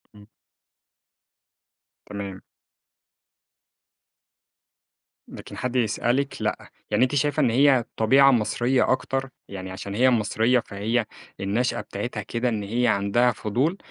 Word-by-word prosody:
إمم. 105 0 -15 1.8
تمام. 100 -2 -7 2.9
لكن - - -10
حد 125 0 -3
يسألِك 120 +4 0
لأ، - - -3 0.2
يعني - - +3
أنتِ 130 +3 0
شايفة 145 +2 +1
إن 130 - +3
هي 130 +1 +4
طبيعة 135 +5 +5
مصرية 120 +2 +1
أكتر 135 +1 -1 0.2
يعني 95 -1 -7
عشان 100 +2 -6
هي 130 +3 +4
مصرية 115 +2 +2
فهي 110 +3 -2 0.3
النشأة 105 +6 -1
بتاعتها - - -5
كده، 120 +2 -2
إن 110 -3 -2
هي 120 +4 0
عَندها 110 +4 +2
فضول 125 - -1
120 Hz, 110 wpm, -24 LUFS, 105-130 Hz, 2.9 s, طبيعة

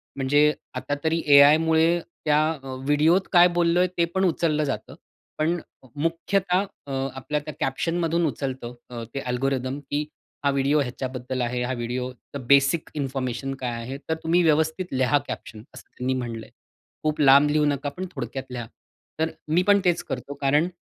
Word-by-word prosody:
म्हणजे 145 +3 +3 0.2
आता 145 - -2
तरी 165 +1 +1
एआयमुळे 160 +4 +6 0.3
त्या 150 0 +4 0.3
अ, 130 -1 -6
व्हिडिओत 160 +6 +3
काय 175 0 +8
बोललोय 175 +1 +3
ते 170 - +3
पण 190 0 +3
उचललं 155 -3 +1
जातं. 135 - -4 0.4
पण 165 +3 +1 0.4
मुख्यतः 180 +5 0 0.2
अ, - - -6 0.2
आपल्या 150 +3 -2
त्या 155 - -6
कॅप्शनमधून 165 +4 0
उचलतं 130 -2 -4 0.2
अ, 120 -1 -6
ते 140 - -2
अल्गोरिदम, 130 +1 -2
की 145 +1 -3 0.4
हा - - +5
व्हिडिओ 140 +2 +2
ह्याच्याबद्दल 130 0 -4
आहे. 125 +1 -1
हां, 130 +1 -2
व्हिडिओ 125 +2 -3 0.4
बेसिक 140 +4 +4
इन्फॉर्मेशन 135 -1 -3
काय 125 -1 -2
आहे? 130 +4 -6
तर 160 - +1
तुम्ही 170 +2 +3
व्यवस्थित 160 +3 +2
लिहा 130 +2 +3
कॅप्शन 110 -1 -7
असं - - -13
त्यांनी 130 +1 -1
म्हटलंय. 115 -3 -5 0.5
खूप 155 0 -1
लांब 140 +1 +7
लिहू 150 0 +3
नका 145 0 0
पण 185 - -3
थोडक्यात 130 +1 -5
लिहा. 120 -2 -5 0.5
तर 160 0 +1 0.2
मी 165 +4 +3
पण 200 0 +6
तेच 175 -1 +2
करतो. 135 +2 -5
कारण 145 +5 +3
145 Hz, 160 wpm, -24 LUFS, 130-160 Hz, 0.5 s, काय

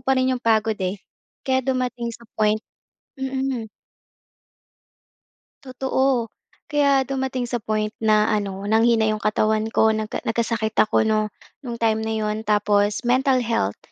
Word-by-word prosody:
pa 265 +1 +1
rin 260 0 +2
'yong 250 - -3
pagod 220 -2 +1
eh. 185 +2 -1 0.5
Kaya 260 -1 +2
dumating 250 -2 -2
sa 235 - -14
point 215 0 +2 0.5
mm. 265 -3 -3 2.0
Totoo. 260 -1 0 0.4
Kaya 280 -3 +2
dumating 265 -2 -2
sa 240 -2 -3
point 215 0 -2
na 215 -1 +4
ano, 200 -1 -3
nanghina 225 +1 +3
'yong 215 0 -1
katawan 215 0 +1
ko, 220 0 +3
nagka 215 0 -3
nagkasakit 225 -1 -1
ako 215 0 +3
'no, 215 -1 +1 0.3
no'ng 235 -3 -6
time 220 -1 +1
na 220 - -2
'yon. 215 0 -2
Tapos 205 +1 +1
mental 260 +1 +3
health. 225 - -1
225 Hz, 140 wpm, -22 LUFS, 215-255 Hz, 2.0 s, na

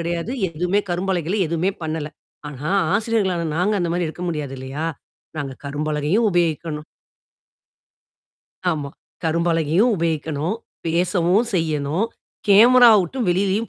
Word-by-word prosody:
கிடையாது. 170 +5 -3 0.2
எதுவுமே 180 +5 0
கரும்பலகைல 180 +1 -1
எதுவுமே 170 +4 0
பண்ணல. 155 -1 -3 0.4
ஆனா, 145 +3 -5 0.2
ஆசிரியர்களான 200 -6 0
நாங்க 205 +5 +1
அந்த 170 -1 -1
மாதிரி 175 -1 0
இருக்க 175 +3 -8
முடியாது 150 -5 -3
இல்லையா? 135 +4 -5 0.5
நாங்க 140 -3 -3
கரும்பலகையும் 150 +8 0
உபயோகிக்கணும். 160 -3 -1 1.9
ஆமா. 145 -4 -3 0.3
கரும்பலகையும் 165 +6 +2
உபயோகிக்கணும், 160 +2 -1 0.3
பேசவும் 175 +5 +2
செய்யணும், 160 +3 0 0.4
கேமரா 240 +4 +8
விட்டு 185 +9 -4
வெளியிலயும் 195 +5 +1
170 Hz, 105 wpm, -21 LUFS, 155-190 Hz, 1.9 s, கேமரா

